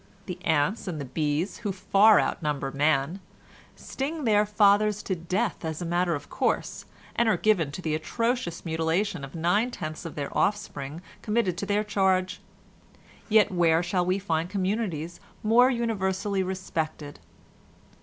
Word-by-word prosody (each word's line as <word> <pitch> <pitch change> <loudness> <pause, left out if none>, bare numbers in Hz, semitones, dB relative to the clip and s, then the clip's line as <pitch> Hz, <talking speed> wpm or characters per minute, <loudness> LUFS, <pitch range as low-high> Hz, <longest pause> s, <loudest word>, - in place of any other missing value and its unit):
The 180 -1 -7
ants 160 +7 +1
and 165 -4 -3
the 140 - -4
bees, 150 +6 -1
who 210 -4 -3
far 200 +3 +5
outnumber 145 -3 -1
man, 145 +4 +1 0.6
sting 295 +3 -4
their 210 -3 +3
fathers 210 0 +3
to 190 - -1
death 185 +6 -2
as 160 -1 -3
a 175 - -4
matter 175 0 +1
of 145 - -7
course, - - -2 0.3
and 235 -1 +3
are - - +3
given 190 -9 +2
to 180 +5 -7
the 155 - -1
atrocious 230 +3 -2
mutilation 160 +1 -1
of 135 +2 -8
nine 180 +9 +1
tenths 155 -9 -6
of 165 - -7
the 145 -2 -3
offspring 165 -6 -2 0.2
committed 210 -5 0
to 200 - -4
their 205 +1 +1
charge, 190 -3 +1 0.9
yet 215 -2 +5
where 170 -2 +3
shall 180 +1 0
we 185 +2 +1
find 170 -3 -1
communities 185 -4 -2 0.2
more 235 +4 +5
universally 200 -5 -1
respected? 160 - -4
185 Hz, 150 wpm, -26 LUFS, 160-210 Hz, 0.9 s, far